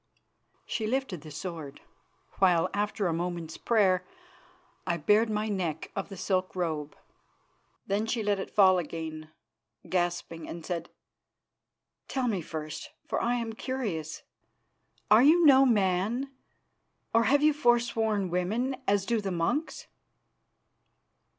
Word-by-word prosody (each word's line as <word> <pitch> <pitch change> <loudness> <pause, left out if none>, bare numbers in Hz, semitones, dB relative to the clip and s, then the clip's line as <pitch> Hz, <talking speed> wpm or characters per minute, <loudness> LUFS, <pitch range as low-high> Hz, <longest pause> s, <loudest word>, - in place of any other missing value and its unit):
She 220 -2 -2
lifted 240 - -2
the 155 - -10
sword, 155 -2 -7 0.6
while, 180 -4 +3
after 205 0 -1
a 170 - +1
moment's 170 -1 -4
prayer, 190 -6 +2 0.8
I 170 -1 +1
bared 210 +8 +3
my 215 0 -1
neck 175 -7 -3
of 195 - -4
the 195 - -8
silk 185 0 -1
robe. 155 -5 -3 0.9
Then 205 +3 -1
she 225 -1 -1
let 205 -1 +1
it - - -5
fall 190 -3 +5
again, 160 -1 -6 0.6
gasping, 175 -2 -2
and 165 -1 -7
said: 170 -2 -4 1.2
"Tell 260 -2 -1
me 200 -6 0
first, 155 -1 -6 0.2
for - - -1
I 240 +1 +1
am 230 -2 -3
curious. 215 - -4 0.9
Are 215 +2 +8
you 320 +5 +6
no 270 -2 +7
man? 215 +5 +1 0.8
Or 230 0 +4
have 285 +2 +3
you 305 0 +5
forsworn 230 - +1
woman, 220 +9 -1
as 200 -1 +2
do 230 -1 0
the 200 - -3
monks?" 185 - -1
195 Hz, 130 wpm, -29 LUFS, 170-230 Hz, 1.2 s, Are